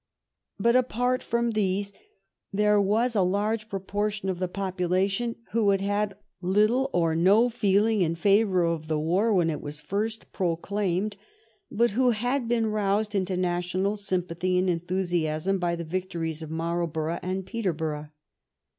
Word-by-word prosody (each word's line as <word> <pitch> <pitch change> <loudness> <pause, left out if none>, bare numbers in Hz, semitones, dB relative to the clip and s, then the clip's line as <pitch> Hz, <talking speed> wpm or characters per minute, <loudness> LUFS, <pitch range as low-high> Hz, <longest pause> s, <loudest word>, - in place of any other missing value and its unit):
But 235 +1 +3
apart 250 0 +1
from 235 0 0
these 200 -1 -1 0.6
there 210 +1 +3
was 225 +5 +1
a 200 - +4
large 210 +4 0
proportion 205 +1 -2
of 180 -2 -2
the 185 - 0
population 195 +4 -1 0.2
who 220 -2 +2
had 195 -1 +2
had 205 0 -1 0.2
little 215 +8 +2
or 165 -2 +2
no 200 +8 +5
feeling 215 -2 +2
in 165 -1 +1
favor 195 0 +3
of 165 -2 -1
the 155 -1 0
war 180 +9 +1
when 175 -5 +3
it 150 - -4
was 150 +1 -7
first 215 +7 -3
proclaimed, 195 +2 -1 0.5
but 235 +2 +2
who 250 +4 +3
had 245 +3 0
been 230 -1 +1
roused 210 0 0
into 185 -2 0
national 180 +2 0
sympathy 185 -2 -1
and 185 0 +2
enthusiasm 175 0 -1
by 175 -1 0
the 170 - -5
victories 165 -2 -3
of 160 - -7
Marl 170 +2 -1
borough 160 +1 -3
and 185 +1 -3
Peterborough. 160 -9 -3
195 Hz, 150 wpm, -26 LUFS, 175-215 Hz, 0.6 s, no